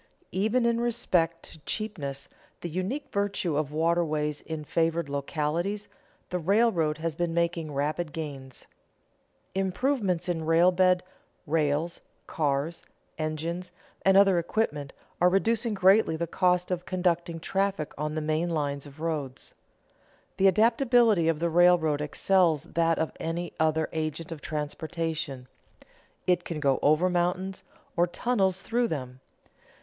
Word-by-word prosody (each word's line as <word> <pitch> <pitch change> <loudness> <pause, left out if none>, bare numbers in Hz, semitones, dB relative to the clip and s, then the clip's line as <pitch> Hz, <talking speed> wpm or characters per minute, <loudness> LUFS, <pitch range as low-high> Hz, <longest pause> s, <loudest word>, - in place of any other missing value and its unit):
_ - - -34 0.3
Even 220 +6 +1
in 235 0 +2
respect 180 -9 +1
to 160 - -10
cheapness, 145 -6 -4 0.3
the 175 - -4
unique 235 - -3
virtue 200 -5 0
of 150 -1 -1
waterways 155 -2 0
in 160 -1 -6
favored 165 +1 0
localities, 155 +8 -2 0.4
the 180 - -1
railroad 175 -4 +2
has 165 0 -2
been 170 +1 -2
making 170 -2 0
rapid 150 +3 -2
gains. 140 -5 -7 0.9
Improvements 195 -1 0
in 170 -2 -1
roadbed, 180 +2 +4 0.4
rails, 155 +2 0 0.2
cars, 150 +2 -1 0.4
engines, 165 +4 -3 0.3
and 195 0 +5
other 195 -3 +6
equipment 150 -6 -2 0.3
are 180 - +6
reducing 220 +3 +1
greatly 195 -2 +4
the 170 +2 -1
cost 180 +1 +1
of 175 -1 -3
conducting 175 -2 0
traffic 195 -3 -1
on 150 +1 -3
the 155 - -1
main 155 +3 0
lines 145 -3 -2
of 145 +2 -14
roads. 150 -5 -4 0.8
The 195 - +5
adaptability 230 -2 +4
of 165 -2 +2
the 170 +2 0
railroad 170 -3 +4
excels 165 0 +2
that 165 -1 +1
of 160 - -1
any 170 +1 -3
other 160 0 +2
agent 155 +1 -3
of 160 -3 -6
transportation; 155 -2 -4 0.8
it 180 -1 +2
can 165 -3 -4
go 140 -3 +2
over 155 +5 +4
mountains 180 +2 -1 0.3
or 175 +1 +3
tunnel 195 +1 +1
through 230 +6 -1
them. 130 - -5
170 Hz, 135 wpm, -27 LUFS, 155-185 Hz, 0.9 s, other